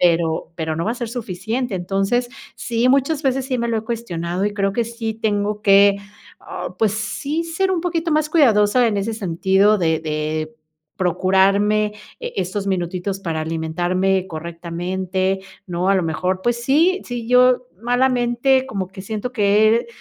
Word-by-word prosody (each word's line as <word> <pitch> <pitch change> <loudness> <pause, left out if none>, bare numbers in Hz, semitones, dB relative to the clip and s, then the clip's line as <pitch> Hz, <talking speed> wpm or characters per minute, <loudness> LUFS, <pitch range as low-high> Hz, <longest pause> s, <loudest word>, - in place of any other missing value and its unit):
pero 170 -2 +1
pero 160 -1 -2
no 165 - -2
va 220 - 0
a - - -2
ser 240 -2 -4
suficiente. 225 0 -3
Entonces, 195 +7 0 0.3
sí, 235 +1 0
muchas 275 +3 +2
veces 270 -1 0
sí 255 -2 -2
me 235 0 -1
lo 230 - 0
he 220 - -3
cuestionado 185 -6 -3
y 205 - 0
creo 195 -1 0
que 235 - 0
sí 225 -1 -4
tengo 210 -1 -1
que, 200 0 +5 0.4
ah, - - -7
pues 215 -2 +2
sí, 280 +9 -3
ser 355 +4 -1
un 355 -3 0
poquito 335 -1 -1
más 305 0 +2
cuidadosa 235 -6 +4
en 205 - -1
ese 215 +3 -2
sentido 195 +2 +2
de 160 -2 +1
de 155 0 -3 0.4
procurarme, 195 +4 +2 0.3
eh, - - -6
estos 195 +2 -2
minutitos 185 +1 -2
para 160 -4 -3
alimentarme 175 +4 0
correctamente, 180 +3 -3 0.3
¿no? 180 +1 -1
A 195 - +4
lo 190 - +2
mejor, 185 +3 -1
pues 235 0 0
sí 330 +9 +3
sí, 240 -2 -5
yo 250 0 +4
malamente 245 +1 +2
como 195 -7 -4
que 190 0 -10
siento 220 +4 -4
que 210 -1 +3
he 235 - 0
205 Hz, 170 wpm, -20 LUFS, 185-240 Hz, 0.4 s, que